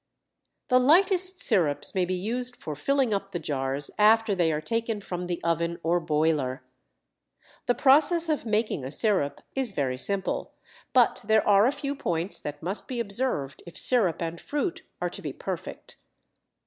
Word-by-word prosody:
The 255 -1 +5
lightest 365 +6 +4
sirups 170 - +3
may 185 -2 +1
be 185 +1 -2
used 245 +6 -3
for 150 - -7
filling 270 - +1
up 195 0 -3
the 175 - -2
jars 135 -2 -3
after 220 0 +5
they 175 -4 +2
are 150 - -1
taken 230 +6 -2
from 180 -3 -5
the 175 -1 -3
oven 170 0 0
or 170 +2 +2
boiler. 150 -5 0 1.0
The 245 - +2
process 310 +5 +4
of 310 -2 0
making 215 - -1
a 130 - -5
sirup 185 -4 0
is 260 -6 -2
very 130 -5 -2
simple, 195 +4 -2 0.4
but 250 -2 +3
there 220 +1 +2
are 205 +2 +6
a - - +2
few 285 0 -4
points 175 -8 -2
that 145 +1 -7
must 190 +5 -3
be 250 -2 -4
observed 200 - -2
if 170 - -10
sirup 200 -10 +2
and 165 0 -5
fruit 295 +5 -3 0.2
are - - -1
to - - -5
be - - -5
perfect. - - -7
200 Hz, 170 wpm, -26 LUFS, 165-250 Hz, 1.0 s, are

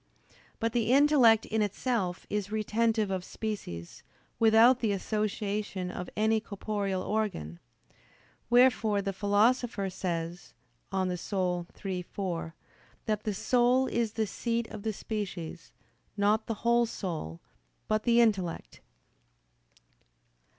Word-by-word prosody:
But 230 -1 -1
the 235 -1 +1
intellect 265 -6 +5
in 220 0 -1
itself 205 -3 -1
is 205 -1 -3
retentive 220 -1 +1
of 185 -1 -2
species, 185 - -6 0.4
without 230 +3 +6
the 220 -4 +1
association 205 -2 -2
of 180 - -6
any 220 +1 +3
corporeal 200 -3 -3
organ. 190 - -2 0.9
Wherefore 240 -4 +4
the 195 0 -2
Philosopher 205 +1 +1
says 175 -1 -4 0.3
(De 195 - -3
Anima 180 -1 -1 0.2
iii, 185 -2 -2
4) 170 -3 -4 0.5
that 215 -1 -1
"the 210 - 0
soul 250 +4 +3
is 230 -4 -1
the 220 -1 0
seat 230 +3 -2
of 215 - -8
the 220 +1 -1
species, 195 -6 -5 0.5
not 210 +2 +2
the 225 - -2
whole 235 0 +4
soul, 155 - -5 0.5
but 215 0 +1
the 235 +1 +4
intellect." 195 -7 -1
210 Hz, 115 wpm, -29 LUFS, 185-225 Hz, 0.9 s, without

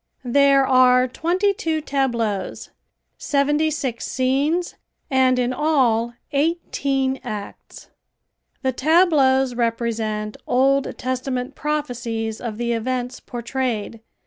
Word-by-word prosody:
There 275 +2 +4
are 255 -1 +5
twenty 360 +9 0
two 320 -4 -2
tableaus; 240 -9 -2 0.5
seventy 295 +2 +1
six 270 -6 -3
scenes 280 +7 0 0.4
and 260 -1 +3
in 250 0 0
all 250 -5 +1 0.2
eighteen 275 -3 0
acts. 205 -1 -8 0.7
The 260 - +2
tableaus 270 -3 +3
represent 225 -3 -2
Old 270 +2 +2
Testament 255 +1 -3
prophecies 240 -7 -3
of 225 -3 -5
the 235 0 -1
events 250 +2 -3
portrayed. 235 -2 -3
260 Hz, 95 wpm, -22 LUFS, 235-280 Hz, 0.7 s, are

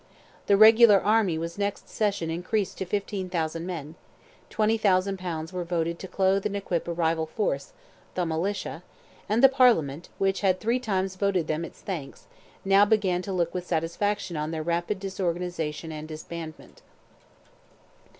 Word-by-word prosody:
The 200 - +5
regular 220 -1 +8
army 205 -5 +2
was 170 +3 -5
next 200 0 -2
session 200 -6 -1
increased 185 +4 -2
to 190 - -2
15,000 185 -4 -2
men; 160 -4 -5 0.6
20,000 200 -3 +2
pounds 165 -2 -5
were 180 -1 -2
voted 170 -1 -2
to 190 - -7
clothe 190 +1 +1
and 200 - -5
equip 180 -4 -2
a - - -1
rival 165 -1 0
force—"the 175 0 -4
Militia"—and 185 +5 -3
the - - +12
Parliament, 225 - +2
which 195 -1 0
had 185 -2 +2
three 235 +3 +1
times 190 -5 -2
voted 190 -4 +1
them 155 +2 -2
its - - -10
thanks, 165 -9 -6 0.4
now 195 +1 +6
began 205 -4 +2
to 195 - -6
look 175 -3 0
with 180 -1 -4
satisfaction 175 +3 -1
on 150 0 -2
their 160 -1 -3
rapid 175 +4 -1
disorganization 175 -5 -3
and 155 0 -7
disbandment. 160 0 -9
185 Hz, 145 wpm, -26 LUFS, 165-200 Hz, 0.6 s, the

